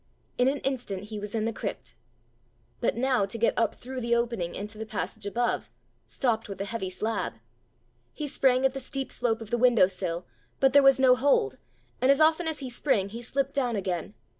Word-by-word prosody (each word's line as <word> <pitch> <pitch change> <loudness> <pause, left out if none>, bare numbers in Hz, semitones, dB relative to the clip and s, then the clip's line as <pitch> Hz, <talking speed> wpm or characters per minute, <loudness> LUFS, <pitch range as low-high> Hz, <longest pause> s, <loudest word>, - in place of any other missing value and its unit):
In 250 - +4
an 275 +2 +2
instant 245 -8 -3
he 215 -2 -5
was 210 +2 -5
in 220 -1 0
the 230 - -1
crypt. - - -5 0.9
But - - 0
now 250 -5 +2
to 200 - -4
get 230 - +2
up 230 -2 +1
through 255 +1 -7
the 235 0 +2
opening 235 -8 -1
into 210 +2 -7
the 220 - -4
passage 215 -1 -4
above 240 +4 -1 0.4
stopped 225 -5 -1
with 195 -1 -7
a 195 - -2
heavy 205 -3 -3
slab! 215 +3 -2 0.8
He 300 - -5
sprang 265 -1 +3
at 265 - +3
the 270 - -4
steep 270 0 -4
slope 225 -2 0
of 220 0 -9
the 240 - +1
window 240 -5 +6
sill, 180 -2 -4 0.3
but 270 -1 +4
there 285 - +8
was 270 -1 +6
no 260 -1 +6
hold, 250 - +2 0.4
and 255 - +3
as 275 - +5
often 320 +2 +4
as 320 -1 -2
he - - -3
sprang 225 -6 +1
he 230 +4 -7
slipped 275 +3 -1
down 250 -5 0
again. 180 - -3
235 Hz, 210 wpm, -27 LUFS, 205-265 Hz, 0.9 s, there